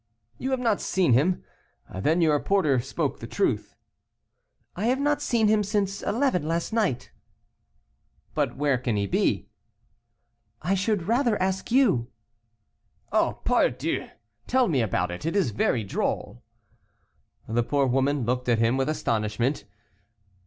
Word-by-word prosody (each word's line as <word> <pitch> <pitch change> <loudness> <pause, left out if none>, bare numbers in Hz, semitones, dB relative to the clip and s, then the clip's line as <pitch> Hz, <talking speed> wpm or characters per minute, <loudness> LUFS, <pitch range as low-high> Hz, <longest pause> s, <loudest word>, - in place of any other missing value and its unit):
"You 260 - -2
have 265 -1 0
not 230 -5 +1
seen 180 -8 +2
him? 160 +9 +2 0.5
Then 155 - +1
your 155 -3 +3
porter 155 -10 +2
spoke 130 +3 -3
the - - -7
truth." - - -1 1.0
"I 200 - -2
have 255 +2 +2
not 290 +1 +1
seen 230 -6 +2
him 215 0 +3
since 200 -1 -1
eleven 210 - 0
last 170 +6 -2
night." 205 - 0 1.2
"But - - -1
where 140 -3 +1
can 120 -3 -1
he 100 -1 0
be?" 100 - 0 1.1
"I 175 +5 -1
should 200 -1 0
rather 235 -1 +2
ask 190 0 -1
you." 225 - +3 1.0
"Oh, - - +1
pardieu, - - +1 0.4
tell 255 -1 +3
me 140 - +1
about 90 -5 0
it, 90 - -7
it 165 +4 -2
is 190 - +2
very 110 +2 0
droll." 95 -9 -3 1.1
The 115 +2 +1
poor 140 +3 +1
woman 135 +1 +1
looked 125 +1 -1
at 120 - +4
him 115 +3 +2
with 135 +2 0
astonishment. 115 -1 -1
155 Hz, 140 wpm, -26 LUFS, -, 1.2 s, at